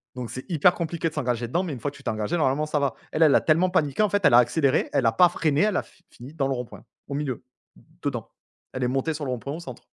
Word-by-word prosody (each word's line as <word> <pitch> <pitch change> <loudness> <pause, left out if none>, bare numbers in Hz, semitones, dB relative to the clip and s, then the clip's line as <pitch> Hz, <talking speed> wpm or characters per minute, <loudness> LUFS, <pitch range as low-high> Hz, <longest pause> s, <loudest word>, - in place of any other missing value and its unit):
donc 125 -2 -5
c'est 130 - -7
hyper 175 +1 +4
compliqué 165 -1 -2
de - - -18
s'engager 125 -5 -2
dedans, 170 +10 0
mais 165 -6 -4
une 125 - -7
fois 145 - -3
que - - -18
tu 140 - -16
t'es - - -2
engagé, 110 +9 -1
normalement 145 0 +1
ça 155 -1 -1
va. 140 -5 -1 0.2
Elle 160 - +2
elle 150 - +6
a - - +5
tellement 165 +4 +3
paniqué, 160 +1 +1
en 210 - +2
fait, 205 0 0
elle 150 - +6
a 120 - +9
accéléré, 135 +3 +2
elle 135 -4 +2
a 115 - +5
pas 175 +10 +5
freiné, 155 -4 0
elle 210 +1 +2
a - - -1
fi - - -24
fini 130 +5 -12
dans 140 -4 -1
le 135 - 0
rond 125 -1 -4
point, - - -13 0.2
au 140 - -5
milieu, 140 -4 -3 0.6
dedans. - - -3 0.4
Elle 130 - -3
est - - +2
montée 135 +5 -1
sur 150 -1 -5
le 130 - -2
rond 125 - -3
point 140 +4 -6
au 165 - -6
centre. 130 -8 -10
140 Hz, 305 wpm, -25 LUFS, 130-160 Hz, 0.6 s, a